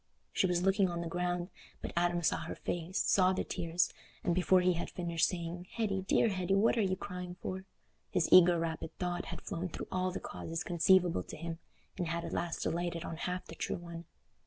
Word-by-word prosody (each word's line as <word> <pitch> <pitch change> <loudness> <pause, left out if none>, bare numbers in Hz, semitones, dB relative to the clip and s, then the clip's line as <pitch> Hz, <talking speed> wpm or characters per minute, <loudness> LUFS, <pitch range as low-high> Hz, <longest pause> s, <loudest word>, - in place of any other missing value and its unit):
She - - +3
was 175 0 +1
looking 195 0 +3
on 170 -1 -3
the 170 - -3
ground, 175 +1 -1 0.3
but - - -6
Adam 175 0 +2
saw - - +3
her - - -5
face, 175 +2 -3
saw 185 -1 +4
the - - -1
tears, 170 +1 0 0.3
and 175 - +2
before 185 +1 +4
he 180 0 +4
had 170 - -3
finished 170 -2 +1
saying, 175 0 -4
"Hetty, 200 -4 0
dear 230 - +4
Hetty, 190 -1 +1
what 210 +5 +4
are 230 - +2
you 190 -2 +1
crying 180 -1 -6
for?" 190 0 -4 0.4
his 175 - +1
eager 180 -1 +8
rapid 165 -1 -3
thought 180 -1 -2
had - - -7
flown 180 +2 -3
through - - -6
all 185 0 +1
the 185 - -4
causes 165 +1 -5
conceivable 175 +1 +4
to - - -9
him, 165 +1 -5 0.4
and 175 - 0
had 170 +1 -2
at - - -5
last 170 -1 -2
alighted 170 0 -1
on 165 - -4
half 180 +2 -3
the - - -10
true - - -2
one. 170 -1 -8
175 Hz, 210 wpm, -33 LUFS, 170-185 Hz, 0.4 s, eager